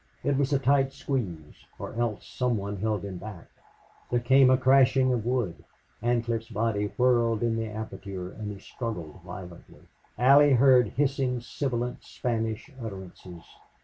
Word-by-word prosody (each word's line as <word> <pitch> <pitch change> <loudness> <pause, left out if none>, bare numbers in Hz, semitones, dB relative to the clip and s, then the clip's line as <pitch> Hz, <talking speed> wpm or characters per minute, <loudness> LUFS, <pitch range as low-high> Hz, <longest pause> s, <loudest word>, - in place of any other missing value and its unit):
It 140 - +1
was 140 +1 +1
a 140 - +4
tight 135 0 +2
squeeze, 90 - -5
or - - -7
else 115 -2 -2
some 125 -2 -1
one 100 0 -4
held 105 0 -1
him 95 -3 -6
back. 100 -3 -9 0.6
There 120 - +1
came 130 +2 +5
a 130 - +5
crashing 130 0 +4
of 115 -2 -2
wood; 120 -9 -1 0.4
Ancliffe's 115 -1 -1
body 110 -2 0
whirled 120 -3 +3
in 115 -1 +1
the 115 0 -2
aperture 100 -4 -6
and 105 -1 -6
he 100 - -8
struggled 95 -6 -6
violently. 90 -2 -11 0.3
Allie 140 +4 +6
heard 130 -1 +6
hissing, 135 -3 0
sibilant 120 0 -3
Spanish 115 +3 -3
utterances. 95 -5 -9
115 Hz, 145 wpm, -27 LUFS, 105-130 Hz, 0.6 s, Allie